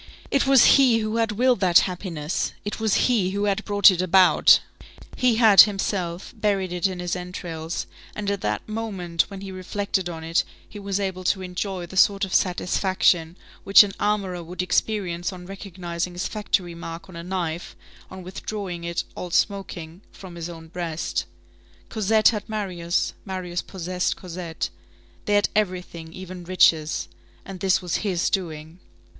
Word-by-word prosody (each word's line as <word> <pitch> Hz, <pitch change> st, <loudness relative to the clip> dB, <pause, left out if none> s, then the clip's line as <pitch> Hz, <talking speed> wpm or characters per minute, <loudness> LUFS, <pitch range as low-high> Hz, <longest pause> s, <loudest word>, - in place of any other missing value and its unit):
It 275 Hz, 0 st, +2 dB
was 270 Hz, -2 st, +7 dB
he 260 Hz, -5 st, +6 dB
who 215 Hz, 0 st, -2 dB
had 225 Hz, -2 st, +1 dB
willed 250 Hz, +3 st, +2 dB
that 180 Hz, -3 st, +5 dB
happiness, 175 Hz, -4 st, -3 dB
it 205 Hz, -, -4 dB
was 220 Hz, -2 st, +2 dB
he 220 Hz, -7 st, +2 dB
who 200 Hz, +2 st, -2 dB
had 205 Hz, +1 st, 0 dB
brought 205 Hz, -1 st, +6 dB
it 180 Hz, -1 st, -1 dB
about; 185 Hz, 0 st, +6 dB, 0.6 s
he 250 Hz, -2 st, +2 dB
had, 220 Hz, -5 st, +8 dB
himself, 195 Hz, -3 st, -1 dB
buried 200 Hz, -4 st, 0 dB
it 180 Hz, +2 st, +1 dB
in 185 Hz, -1 st, -5 dB
his 180 Hz, 0 st, -2 dB
entrails, 175 Hz, -2 st, -5 dB, 0.3 s
and 205 Hz, -1 st, -2 dB
at 200 Hz, -, -3 dB
that 105 Hz, 0 st, -2 dB
moment, 195 Hz, -6 st, -2 dB
when 195 Hz, -2 st, -8 dB
he 195 Hz, -1 st, -7 dB
reflected 190 Hz, 0 st, -2 dB
on 165 Hz, -2 st, -7 dB
it, 165 Hz, +1 st, +1 dB, 0.2 s
he 205 Hz, -, -10 dB
was 200 Hz, -1 st, -2 dB
able 190 Hz, -2 st, -3 dB
to 190 Hz, +1 st, +1 dB
enjoy 180 Hz, 0 st, -4 dB
the 185 Hz, +2 st, -9 dB
sort 200 Hz, +1 st, +4 dB
of 190 Hz, -, -8 dB
satisfaction 180 Hz, -2 st, +1 dB, 0.3 s
which 195 Hz, +1 st, +8 dB
an 200 Hz, -1 st, -5 dB
armorer 200 Hz, -4 st, -1 dB
would 180 Hz, +2 st, -4 dB
experience 180 Hz, -2 st, -1 dB
on 180 Hz, -1 st, -10 dB
recognizing 180 Hz, -2 st, -5 dB
his 175 Hz, -, -3 dB
factory 200 Hz, -4 st, -1 dB
mark 165 Hz, 0 st, -8 dB
on 185 Hz, -, -12 dB
a 170 Hz, -, -6 dB
knife, 175 Hz, -2 st, -4 dB, 0.3 s
on 190 Hz, 0 st, -9 dB
withdrawing 185 Hz, -1 st, -6 dB
it, 170 Hz, 0 st, -2 dB
all 180 Hz, -, -6 dB
smoking, 180 Hz, -3 st, -2 dB
from 185 Hz, -3 st, -11 dB
his 170 Hz, 0 st, -6 dB
own 165 Hz, -1 st, -10 dB
breast. 165 Hz, -1 st, -3 dB, 0.6 s
Cosette 215 Hz, 0 st, +3 dB
had 215 Hz, -2 st, -4 dB
Marius, 180 Hz, -5 st, -2 dB
Marius 185 Hz, -3 st, -4 dB
possessed 180 Hz, -1 st, -3 dB
Cosette. 175 Hz, -2 st, -5 dB, 0.5 s
They 205 Hz, -, +2 dB
had 205 Hz, -, +3 dB
everything, 180 Hz, -5 st, -2 dB
even 185 Hz, 0 st, -9 dB
riches. 165 Hz, -3 st, +2 dB, 0.4 s
And 195 Hz, -2 st, -8 dB
this 190 Hz, 0 st, +2 dB
was 175 Hz, -, -1 dB
his 185 Hz, -5 st, -1 dB
doing. 160 Hz, -2 st, -4 dB
185 Hz, 165 wpm, -24 LUFS, 175-200 Hz, 0.6 s, had